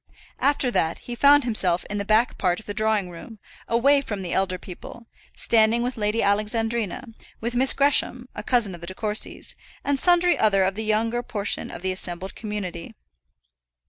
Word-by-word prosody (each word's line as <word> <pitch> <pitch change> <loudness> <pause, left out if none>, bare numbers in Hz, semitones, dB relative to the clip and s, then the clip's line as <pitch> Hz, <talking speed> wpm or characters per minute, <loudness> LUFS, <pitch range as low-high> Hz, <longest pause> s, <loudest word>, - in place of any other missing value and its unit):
After 280 -3 +1
that, 165 -7 0
he 240 - -6
found 285 +3 +5
himself 190 -7 +1
in 205 0 -4
the 200 - -3
back 220 +4 +2
part 180 0 +1
of 220 - -15
the 205 - -5
drawing 215 -4 0
room, 195 +6 -11 0.3
away 275 +5 +3
from 210 -7 -5
the 175 - -4
elder 190 -1 0
people, 190 +6 -11 0.3
standing 230 +1 +2
with 250 +1 -3
Lady 215 +1 0
Alexandrina, 220 +3 -1 0.3
with 235 +2 -3
Miss 255 +2 +5
Gresham, 270 -3 +2
a - - -5
cousin 225 -4 +1
of 170 - -10
the 170 - -8
De 185 - -5
Courcys, 210 0 -2 0.3
and 280 -1 0
sundry 350 +1 +3
other 195 -3 +3
of 190 +1 0
the 220 +3 -4
younger 225 +3 0
portion 205 -4 -2
of - - -9
the 190 - 0
assembled 185 0 -3
community. 205 -6 -6
215 Hz, 180 wpm, -24 LUFS, 195-240 Hz, 0.3 s, found